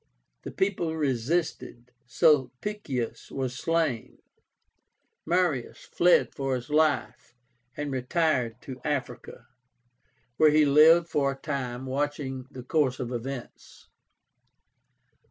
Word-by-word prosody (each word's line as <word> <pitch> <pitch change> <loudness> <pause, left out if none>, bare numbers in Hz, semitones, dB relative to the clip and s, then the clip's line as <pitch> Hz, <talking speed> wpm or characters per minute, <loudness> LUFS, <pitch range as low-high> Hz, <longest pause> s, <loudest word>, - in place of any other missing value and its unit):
The - - -7
people 180 -4 -1
resisted; 135 -2 -2 0.2
Sulpicius 130 - 0
was 130 -2 -3
slain; 160 -4 -1 1.1
Marius 170 -7 0
fled 175 0 +3
for 135 -1 -2
his 125 +4 -7
life, 150 -5 0 0.4
and 150 -1 -3
retired 125 -3 0
to 130 -1 -9
Africa, 145 -4 -4 0.9
where 155 - +6
he 150 0 +4
lived 160 +4 +6
for 140 -3 0
a 135 - -15
time, 130 -4 -4
watching 135 -1 -3
the 130 -2 -10
course 130 -1 0
of 125 -1 -4
events. 125 +1 -8
140 Hz, 100 wpm, -27 LUFS, 125-155 Hz, 1.1 s, where